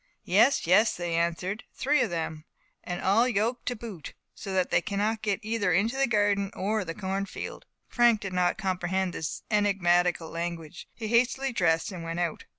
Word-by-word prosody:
"Yes! 225 +9 +4
yes!" 200 +6 +4
they 175 -1 -3
answered, 170 +5 -1
"three 285 +1 +2
of 240 - +1
them; 160 -2 -4 0.4
and 175 0 -5
all 215 +6 +4
yoked 235 +1 -1
to 245 - 0
boot, 215 -8 -8 0.2
so 195 - -7
that 185 -1 0
they - - +3
cannot 210 +2 -1
get 205 -2 0
either 215 -3 0
into 210 +8 +2
the 270 0 +2
garden 205 -3 +2
or 210 +2 -1
the 165 -2 -6
cornfield." 195 0 -5 0.2
Frank 240 -3 +4
did 195 -3 -6
not 180 -1 +1
comprehend 185 -2 -1
this 160 - -4
enigmatical 180 -5 +2
language; 170 0 -5
he 220 -2 -5
hastily 255 +3 +2
dressed 170 -1 +1
and 175 -3 -7
went 165 +1 -4
out. 170 -3 -2
195 Hz, 175 wpm, -28 LUFS, 175-220 Hz, 0.4 s, Yes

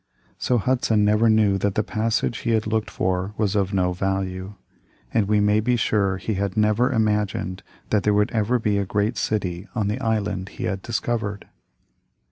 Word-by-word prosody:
So 125 - +1
Hudson 115 -3 +2
never 105 +2 +4
knew 105 -3 +3
that 100 0 0
the 110 - +2
passage 110 +1 -1
he 115 - 0
had 110 -1 +1
looked 110 0 -1
for 95 +2 -2
was 105 -2 0
of 100 -1 +1
no 90 -2 +1
value, 95 +1 -3 0.6
and 105 -3 +2
we 105 0 +3
may 105 +1 +3
be 120 +3 +1
sure 100 -4 +1
he 105 +4 -3
had 100 0 -2
never 110 +4 +3
imagined 105 -5 0 0.3
that 105 - +3
there 105 - +2
would 105 0 +2
ever 110 +2 +1
be 105 -3 0
a - - +1
great 105 +4 0
city 95 -4 -2
on 105 -3 0
the 105 +5 -2
island 105 -5 -1
he - - -8
had 95 0 -2
discovered. 110 -2 -3
105 Hz, 185 wpm, -23 LUFS, 100-110 Hz, 0.6 s, never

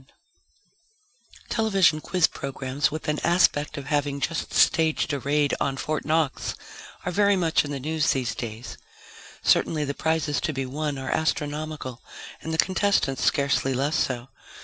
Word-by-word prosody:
net - - -26 1.4
_Television 195 -9 +3
quiz 180 0 +2
programs 135 0 -2
with 155 +1 -6
an 150 0 0
aspect 165 -3 +2
of 140 - -6
having 145 0 0
just 165 +2 -2
staged 160 -1 +3
a 140 - -1
raid 145 +1 +1
on 135 -1 -1
Fort 155 +2 -2
Knox 155 -3 0 0.5
are 180 - -1
very 200 +2 +3
much 170 -4 +2
in 145 - -6
the 140 -1 -3
news 155 +2 0
these 130 -3 0
days. 115 0 -7 0.6
Certainly 155 -2 +3
the 140 - -2
prizes 160 -1 0
to 155 - -1
be 135 -1 -2
won 145 +2 -3
are 135 0 -4
astronomical 150 -4 -2 0.4
and 160 - -5
the 160 - -1
contestants 185 -8 +1
scarcely 140 -2 +2
less 140 +5 0
so. 125 0 -1
150 Hz, 155 wpm, -25 LUFS, 135-160 Hz, 1.4 s, Television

